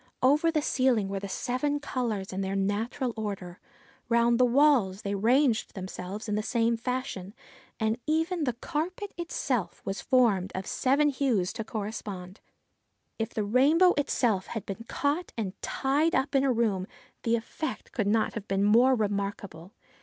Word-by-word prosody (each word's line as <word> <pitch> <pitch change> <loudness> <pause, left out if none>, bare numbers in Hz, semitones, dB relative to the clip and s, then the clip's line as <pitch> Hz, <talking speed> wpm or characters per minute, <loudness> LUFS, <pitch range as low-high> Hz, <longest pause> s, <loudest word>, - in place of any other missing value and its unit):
Over 295 +5 +4
the 310 -2 0
ceiling 250 -9 +2
were 195 0 -2
the 200 0 -6
seven 255 +8 -1
colours 230 -9 -3
in 190 - -2
their 195 0 -2
natural 220 +6 -1
order. 195 -5 -5 0.5
Round 235 0 +3
the 250 - +6
walls 245 -7 +3
they 200 - -2
ranged 235 +4 +2
themselves 190 +2 -6
in 210 - -1
the 210 - +1
same 230 +1 +1
fashion, 230 -5 -4 0.4
and 220 +2 0
even 320 +1 +1
the 250 - 0
carpet 340 - -4
itself 265 - -2
was 195 +1 -3
formed 210 -8 +3
of 190 0 -3
seven 280 +3 +2
hues 255 -10 0
to 225 - -4
correspond. 205 -3 -6 0.8
If 225 - -1
the 215 - 0
rainbow 290 - +5
itself 235 -8 +1
had 225 - -5
been 215 +3 -6
caught 295 +5 -1
and 200 -5 -2
tied 290 +5 +1
up 270 +2 0
in 270 -1 +3
a 270 - +3
room, 215 -6 0 0.3
the 230 0 +2
effect 235 +7 -5
could 215 -5 -1
not 220 +2 +2
have 210 -3 -6
been 195 +1 +1
more 240 +6 +5
remarkable. 200 -5 -3
230 Hz, 160 wpm, -28 LUFS, 200-270 Hz, 0.8 s, the